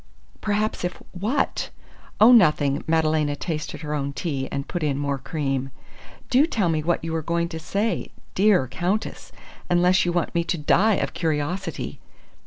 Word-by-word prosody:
"Perhaps 210 -1 -1
if 180 0 -3
what?" 205 +9 -1 0.5
"Oh, 220 +4 +8
nothing!" 150 - +4
Madalena 155 -2 +2
tasted 155 -1 -4
her 150 -1 -4
own 140 -1 -2
tea 140 -5 -3
and 140 0 -3
put 175 - -3
in 145 -3 0
more 140 -1 -1
cream. 135 -2 -2 0.6
"Do 270 +5 +5
tell 205 - 0
me 155 -1 +1
what 170 +2 0
you 165 0 -3
were 165 - 0
going 170 +2 -1
to 160 -2 -6
say, 205 +7 -1 0.2
dear 190 -8 +4
Countess, 180 - -3 0.4
unless 180 +1 +4
you 175 - 0
want 175 -1 -1
me 170 - +1
to 170 - -1
die 195 +8 +3
of - - -2
curiosity." 165 +3 -2
165 Hz, 165 wpm, -24 LUFS, 150-185 Hz, 0.6 s, Oh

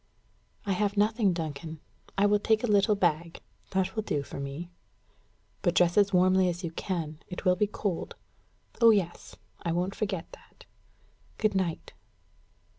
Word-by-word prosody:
"I 200 - -1
have 205 +2 0
nothing, 210 -1 +3
Duncan. 160 -1 -5 0.4
I 200 - +4
will 205 0 +4
take 220 +2 +2
a - - +3
little 210 -1 +4
bag 170 -3 0 0.3
that 190 +2 -1
will 220 - 0
do 145 -9 -2
for 140 - -8
me." 140 +6 -6 0.9
"But 175 -1 +1
dress 175 -1 +4
as 200 -1 +4
warmly 185 0 +4
as 175 +1 -4
you 170 - -3
can. 165 -3 -4
It 180 +2 -7
will 180 0 +5
be 210 +2 +1
cold." 200 -3 -3 0.7
"Oh, 230 - +9
yes; 190 -6 0 0.3
I 170 - -1
won't 180 +3 -1
forget 195 -6 -3
that. - - -16 0.7
Good 215 -1 +1
night." 185 -4 -2
185 Hz, 160 wpm, -29 LUFS, 170-205 Hz, 0.9 s, Oh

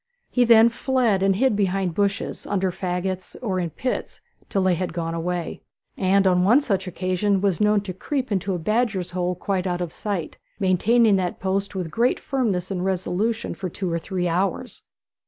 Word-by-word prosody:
He 245 -1 +3
then 230 0 +7
fled 235 -4 +1
and 195 0 +3
hid 255 +1 +2
behind 195 -3 0
bushes, 200 +3 -2
under 190 -2 0
faggots, 185 +1 -3
or 195 -6 -1
in 175 -2 -1
pits 255 - -4 0.3
till 195 - +1
they 185 -1 +3
had 175 0 -2
gone 165 -1 -2
away; 170 +1 -3 0.3
and 195 +1 +2
on 180 -1 +4
one 230 +9 +6
such 195 -9 -1
occasion 185 +2 0
was 195 0 0
known 210 0 +4
to 195 -2 -6
creep 260 - -3
into 190 -1 0
a - - -1
badger's 200 -1 0
hole 180 0 -1
quite 190 +1 -2
out 175 -1 -1
of 175 -3 -4
sight, 195 -7 -4 0.2
maintaining 205 +3 +4
that 180 -2 -2
post 195 +1 -2
with 180 -4 -3
great 240 +2 +2
firmness 205 -9 -1
and 180 -2 -2
resolution 190 +4 -1
for 185 -2 -5
two 180 +1 -4
or 170 - 0
three 180 +1 -2
hours. 180 +3 -1
190 Hz, 185 wpm, -23 LUFS, 180-210 Hz, 0.3 s, then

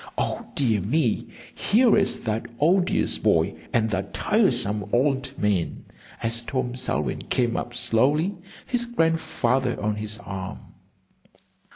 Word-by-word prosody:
"O - - -2
dear 115 -7 +2
me, 120 - 0 0.3
here 230 +2 +3
is 200 -1 +1
that 110 -1 -2
odious 180 +4 +2
boy - - +2 0.2
and 115 -1 +2
that 95 -1 -3
tiresome 105 0 +2
old 135 +1 +1
man!" 100 -5 -1 0.4
as 115 +1 +2
Tom 125 0 -3
Selwyn 100 - -2
came 120 -2 +1
up 120 - -4
slowly, 150 - +1 0.3
his 240 -1 0
Grandfather 160 - 0
on 105 0 -1
his 110 0 -2
arm. 95 0 -5
120 Hz, 125 wpm, -24 LUFS, 105-155 Hz, 0.4 s, here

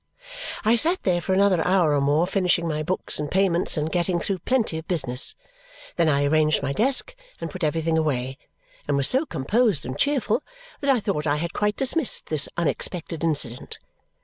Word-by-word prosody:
I 225 +2 +4
sat 335 +9 +1
there 175 -2 +1
for 190 - -4
another 195 -3 +3
hour 180 -5 +2
or 145 - +1
more, 145 +4 +2
finishing 180 -3 0
my 155 -1 -2
books 180 +1 -1
and 150 -1 -3
payments 185 -3 +1
and 155 +1 -2
getting 175 0 0
through 190 +1 -2
plenty 220 -6 0
of 160 - -13
business. 135 -8 0 0.6
Then 170 -2 +2
I 140 -1 +2
arranged 155 0 +2
my 140 0 -1
desk, 270 - +2 0.2
and 165 - -6
put 185 +1 -7
everything 160 +1 0
away, 130 -4 -2 0.5
and 145 -1 +1
was 140 -1 +3
so 270 +5 +1
composed 200 - 0
and 130 +2 -5
cheerful 270 -4 0 0.4
that 280 - -2
I 255 -4 +3
thought 160 -7 -2
I 145 - +2
had 170 +3 -4
quite 210 0 0
dismissed 270 +1 +1
this 150 -3 +2
unexpected 170 0 -2
incident. 140 -7 -1
170 Hz, 185 wpm, -23 LUFS, 150-200 Hz, 0.6 s, I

